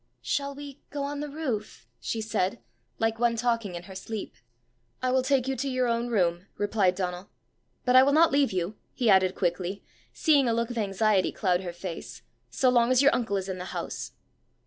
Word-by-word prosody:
"Shall 280 0 -1
we 285 -1 -9
go 285 -1 -4
on 285 +1 -3
the 295 0 -4
roof?" 265 -8 -4
she 225 - -3
said, 210 -4 -1 0.4
like 225 0 0
one 235 -1 +2
talking 230 -5 -1
in 175 - -6
her 190 - -11
sleep. 205 +3 -6 0.7
"I 255 - 0
will 260 0 +3
take 265 -1 +1
you 270 - 0
to 275 +3 -2
your 255 -1 +1
own 235 0 0
room," 180 -5 0
replied 205 -3 +2
Donal. 180 0 -4 0.3
" - - -45
But 250 0 +3
I 255 - +10
will 275 +2 +4
not 320 +3 +5
leave 280 -1 +3
you," 185 +3 -2 0.2
he 235 -4 +2
added 190 -1 +4
quickly, 180 +2 -2 0.3
seeing 290 -5 +3
a - - +2
look 235 +1 -1
of 240 - -6
anxiety 200 -1 +2
cloud 180 -2 +1
her 180 -2 -5
face, 175 0 -7
" - - -45
so 260 - +2
long 240 -1 +4
as 255 +1 +4
your 280 - +6
uncle 225 -5 0
is 190 0 -3
in 185 -1 -4
the 180 - -5
house." - - -5
225 Hz, 215 wpm, -27 LUFS, 190-260 Hz, 0.7 s, I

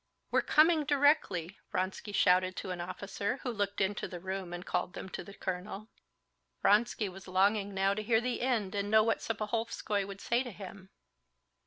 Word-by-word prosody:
"We're - - +4
coming 315 0 +4
directly!" 275 - +2
Vronsky 190 +2 -2
shouted 185 -1 +3
to 185 - -5
an 175 -1 -4
officer, 200 +5 -3
who 250 - -1
looked 205 -2 -2
into 195 +1 0
the 175 - -7
room 190 0 -4
and 175 +1 -6
called 180 0 -1
them 190 - -7
to - - -6
the 200 +3 -12
colonel. 190 +3 -5 0.7
Vronsky 215 0 +3
was 190 +1 -10
longing 200 +2 +2
now 195 +1 +3
to 210 - -3
hear 225 +1 +3
to 230 - 0
the 250 0 -1
end 230 -7 0
and 200 0 -1
know 220 0 +6
what 225 0 +1
Serpuhovskey 215 -1 -1
would 200 0 -8
say 235 +4 +1
to 255 - -5
him. 190 -1 -10
200 Hz, 185 wpm, -32 LUFS, 185-225 Hz, 0.7 s, know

